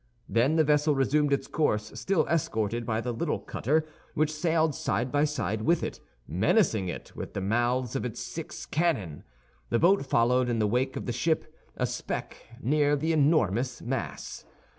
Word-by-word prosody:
Then 125 +7 +2
the 160 - +5
vessel 150 0 +3
resumed 145 +2 +2
its 140 - +1
course, 105 -10 0
still 195 -3 +1
escorted 115 -7 -1
by 110 -1 0
the 125 - -2
little 115 - -1
cutter, 155 +5 0 0.3
which 155 +1 +1
sailed 160 0 +1
side 120 +1 -1
by 145 +1 +3
side 130 -8 -2
with 170 +8 +2
it, - - -4 0.3
menacing 110 - +2
it - - -8
with - - -7
the - - -1
mouths 120 +5 0
of 135 - -1
its 125 -3 -4
six 135 +6 -6
cannon. 135 - -1 0.5
The - - +2
boat 180 +4 +4
followed 125 -1 +2
in 120 - 0
the 110 - +2
wake 125 +5 0
of - - -4
the 120 - -2
ship, 160 +7 0 0.2
a - - +1
speck - - -4 0.3
near 145 +3 +3
the 160 +3 0
enormous 130 - +2
mass. 130 +3 -4
135 Hz, 175 wpm, -28 LUFS, 115-155 Hz, 0.5 s, the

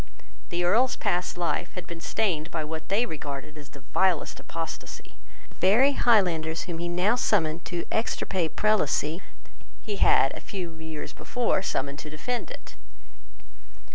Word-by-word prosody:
The 175 +1 -1
Earl's 235 +9 +4
past 180 0 -1
life 175 0 -1
had 180 -2 -5
been 170 -1 -8
stained 170 -8 0
by 160 -3 -2
what 160 +1 -6
they 210 +5 +3
regarded 145 - -6
as 145 -1 -11
the 140 - -14
vilest 185 -5 +2
apostasy. 165 -1 -6 0.4
The - - -19
very 225 +10 +5
Highlanders 175 - +3
whom 170 -2 -5
he 175 0 -2
now 180 +6 +3
summoned 170 -9 +1
to 175 -1 -3
extirpate 190 -6 -1
Prelacy 180 -5 +2 0.6
he 210 -3 -3
had 135 - +5
a - - -7
few 180 -4 -5
years 160 -2 -6
before 240 -6 0
summoned 140 -6 -2
to 150 - -7
defend 235 +11 -3
it. - - -10
175 Hz, 150 wpm, -27 LUFS, 160-200 Hz, 0.6 s, very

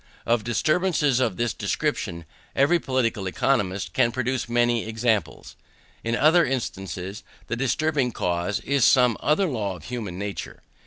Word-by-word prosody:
Of 115 -2 +2
disturbances 150 - +1
of 125 -8 0
this 120 -2 0
description 85 0 -2 0.3
every 155 +6 +4
political 120 -8 -1
economist 95 -4 0
can 120 -3 +3
produce 130 0 -2
many 120 -1 +2
examples. 110 -1 -1 0.5
In 115 +1 0
other 160 +6 +5
instances 100 - -4 0.2
the - - -3
disturbing 135 +1 0
cause 90 0 -1
is 140 -2 +1
some 125 -2 +5
other 155 +7 +2
law 110 - -2
of 85 - -13
human 105 -4 -5
nature. 100 0 -6
120 Hz, 140 wpm, -24 LUFS, 100-135 Hz, 0.5 s, other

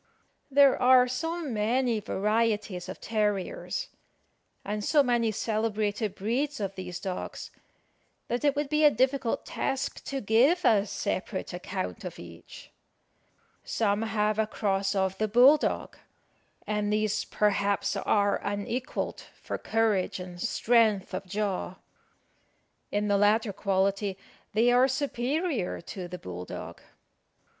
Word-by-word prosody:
There 280 -1 +5
are 250 0 +6
so 325 +7 -3
many 235 0 +1
varieties 210 -2 -1
of - - -7
terriers, 210 - -2 0.8
and 210 +1 -3
so 290 +6 +4
many 240 -3 +1
celebrated 215 -1 -1
breeds 265 +8 -1
of 195 -2 -3
these 180 -2 -6
dogs, 185 -1 -5 0.8
that 240 +3 -2
it 285 -1 +3
would 290 0 -1
be 305 +2 +1
a 300 - +9
difficult 260 -1 0
task 270 0 -3
to 275 - -3
give 260 - +3
a 210 -2 +4
separate - - -3
account - - -5
of - - -6
each. - - -12 0.9
Some 205 -2 0
have 215 -1 0
a 220 - +2
cross 195 -2 -1
of 190 0 0
the 215 - +1
bull 250 +7 +7
dog; - - -3 0.7
and 210 -1 -1
these, 210 0 +1
perhaps, 200 -1 0
are 205 -1 +1
unequalled 205 +7 -3 0.2
for - - -5
courage 220 -5 0
and 180 -1 -8
strength 220 -5 +2
of 190 +1 -4
jaw. 195 -2 -2 1.2
In 205 0 0
the 200 -1 +3
latter 210 +1 +3
quality 195 0 0 0.4
they 230 +3 +4
are 250 +2 +5
superior 270 - -1
to 180 +1 -7
the 180 +1 -7
bull 90 - -7
dog. - - -8
215 Hz, 130 wpm, -28 LUFS, 200-250 Hz, 1.2 s, a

